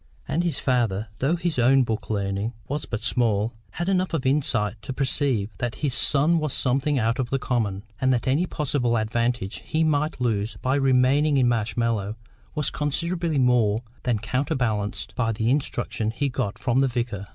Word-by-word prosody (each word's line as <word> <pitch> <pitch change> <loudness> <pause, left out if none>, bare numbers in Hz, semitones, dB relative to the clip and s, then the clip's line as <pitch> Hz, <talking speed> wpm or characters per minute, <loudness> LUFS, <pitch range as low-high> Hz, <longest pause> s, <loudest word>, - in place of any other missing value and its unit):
And 170 - 0
his 170 -2 -1
father, 115 -6 0
though 145 +6 +2
his 170 -5 -1
own 130 +2 +5
book 115 -2 -3
learning 100 +1 -1
was 145 +2 -3
but 115 - -4
small, 115 -2 +1 0.2
had 175 - -3
enough 185 -3 +1
of 135 - -2
insight 115 -6 +1
to 130 - -5
perceive 130 -5 0
that 120 -2 -2
his 135 - 0
son 150 +5 +3
was 155 -3 -2
something 135 +3 +1
out 115 +1 +1
of 125 -2 -1
the 135 - +1
common, 110 -7 -1 0.2
and 130 0 +2
that 125 +1 0
any 150 +8 +2
possible 130 -7 0
advantage 115 -1 -1
he 160 +1 0
might 150 -1 0
lose 110 -3 -1
by 130 - +1
remaining 135 +2 +3
in 130 -2 +4
Marshmallows 115 -2 0 0.4
was 150 -2 +2
considerably 165 +2 -1
more 120 -4 +3 0.2
than 120 -3 0
counterbalanced 120 -3 -2
by 115 -3 0
the 115 +2 0
instruction 120 -5 -1
he 140 +5 -1
got 105 -5 -3
from 125 0 +1
the 135 - +4
vicar. 115 -5 -3
125 Hz, 175 wpm, -24 LUFS, 115-145 Hz, 0.4 s, own